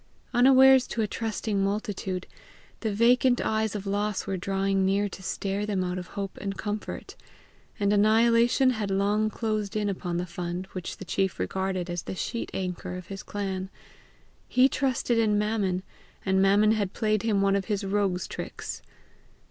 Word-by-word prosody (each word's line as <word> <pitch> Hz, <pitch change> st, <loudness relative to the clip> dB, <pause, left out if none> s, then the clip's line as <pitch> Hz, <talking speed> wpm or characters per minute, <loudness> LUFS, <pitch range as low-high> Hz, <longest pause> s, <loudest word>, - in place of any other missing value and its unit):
Unawares 265 Hz, +1 st, +7 dB
to 225 Hz, -, -1 dB
a -, -, 0 dB
trusting 215 Hz, -2 st, -2 dB
multitude, 195 Hz, -3 st, -2 dB, 0.5 s
the 220 Hz, -, -1 dB
vacant 245 Hz, +4 st, +4 dB
eyes 220 Hz, -1 st, 0 dB
of 205 Hz, -1 st, -4 dB
loss 205 Hz, 0 st, -1 dB
were 195 Hz, -, -2 dB
drawing 195 Hz, +1 st, 0 dB
near 200 Hz, +2 st, +2 dB
to 190 Hz, -, -9 dB
stare 195 Hz, +2 st, -2 dB
them 200 Hz, -3 st, -1 dB
out 180 Hz, 0 st, -2 dB
of 180 Hz, -, -8 dB
hope 195 Hz, -1 st, -4 dB
and 195 Hz, -1 st, -4 dB
comfort; 210 Hz, 0 st, -5 dB, 0.6 s
and 200 Hz, 0 st, +2 dB
annihilation 230 Hz, +4 st, +4 dB
had 215 Hz, -4 st, -2 dB
long 205 Hz, +2 st, +1 dB
closed 215 Hz, -1 st, -2 dB
in 210 Hz, -1 st, 0 dB
upon 180 Hz, -3 st, -3 dB
the 175 Hz, -, -1 dB
fund 175 Hz, +1 st, -4 dB
which 185 Hz, -2 st, -6 dB
the 190 Hz, -, -8 dB
chief 190 Hz, +1 st, 0 dB
regarded 185 Hz, -, -2 dB
as 175 Hz, -1 st, -3 dB
the -, -, -6 dB
sheet 235 Hz, +5 st, -3 dB
anchor 180 Hz, -1 st, -4 dB
of 180 Hz, -1 st, -9 dB
his 195 Hz, -, -6 dB
clan: 190 Hz, -2 st, -4 dB, 0.8 s
he 255 Hz, +1 st, +5 dB
trusted 255 Hz, -4 st, 0 dB
in 215 Hz, -2 st, +3 dB
Mammon, 205 Hz, -3 st, 0 dB, 0.4 s
and 190 Hz, 0 st, +3 dB
Mammon 205 Hz, +2 st, +5 dB
had 205 Hz, -4 st, 0 dB
played 215 Hz, -2 st, +1 dB
him 210 Hz, -3 st, +1 dB
one 195 Hz, 0 st, +3 dB
of 195 Hz, -1 st, -1 dB
his 205 Hz, -2 st, -1 dB
rogue's 195 Hz, -2 st, 0 dB
tricks. -, -, -6 dB
200 Hz, 170 wpm, -27 LUFS, 190-220 Hz, 0.8 s, Unawares